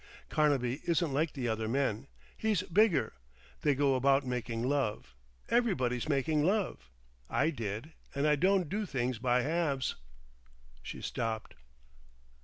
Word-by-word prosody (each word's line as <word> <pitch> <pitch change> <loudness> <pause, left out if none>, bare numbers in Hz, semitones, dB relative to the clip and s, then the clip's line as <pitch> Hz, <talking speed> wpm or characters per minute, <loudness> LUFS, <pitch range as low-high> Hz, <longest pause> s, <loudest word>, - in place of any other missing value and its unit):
Carnaby 140 -3 +1
isn't 170 -3 +1
like 155 +3 +1
the 130 -3 -3
other 110 -1 -1
men. 130 -1 0 0.3
He's 215 -5 0
bigger.... 195 0 +3 0.5
They 145 -2 +3
go 140 0 +3
about 135 +1 +3
making 120 -2 -2
love. 135 - -1 0.4
Everybody's 155 - +1
making 150 +1 +2
love. 185 - 0 0.4
I 155 +3 +2
did.... 115 +4 -5 0.2
And 140 +1 +1
I 150 0 +5
don't 185 +3 +2
do 205 +4 -2
things 125 -5 -1
by 125 0 +2
halves." 145 -4 0 0.9
She - - -8
stopped. 110 -1 -3
140 Hz, 130 wpm, -32 LUFS, 125-165 Hz, 0.9 s, I